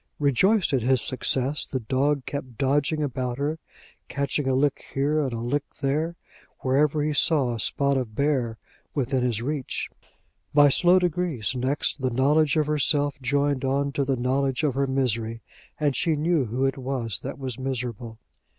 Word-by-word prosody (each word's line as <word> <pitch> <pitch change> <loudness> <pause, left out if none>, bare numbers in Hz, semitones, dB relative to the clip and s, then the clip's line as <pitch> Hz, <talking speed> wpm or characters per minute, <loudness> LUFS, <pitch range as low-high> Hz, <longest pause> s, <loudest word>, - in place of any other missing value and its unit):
Rejoiced 160 - +2
at 130 - +2
his 130 +2 +3
success, 130 +3 0
the 130 - -2
dog 135 +4 0
kept 130 -5 -6
dodging 145 +4 +1
about 125 -3 -2
her, 150 +3 -2 0.5
catching 140 0 -1
a 130 - +2
lick 140 +1 +1
here 145 +3 +2
and 135 -3 -1
a 115 - -3
lick 120 +5 -1 0.2
there, 155 +4 -1 0.5
wherever 145 +3 +2
he 150 0 0
saw 140 -4 +2
a 115 - -5
spot 140 +5 +1
of 115 -5 -4
bare 130 -6 0 0.4
within 130 -2 0
his 120 -2 -1
reach. 145 -1 -3 0.6
By 145 -1 +7
slow 175 +6 +4
degrees, 175 - 0
next, 130 +3 -1
the 130 - +1
knowledge 145 +5 +2
of 155 - +3
herself 145 -1 +1
joined 140 +1 +1
on 140 +1 0
to 140 - 0
the 135 0 0
knowledge 130 +2 0
of 145 -3 +2
her 140 +1 0
misery, 115 -4 -1 0.4
and 145 -3 +1
she 160 +5 +1
knew 155 -1 +1
who 125 +4 -1
it 135 0 -1
was 125 -6 -3
that 135 - -6
was 130 -3 -5
miserable. 120 -3 -4
135 Hz, 170 wpm, -25 LUFS, 125-145 Hz, 0.6 s, By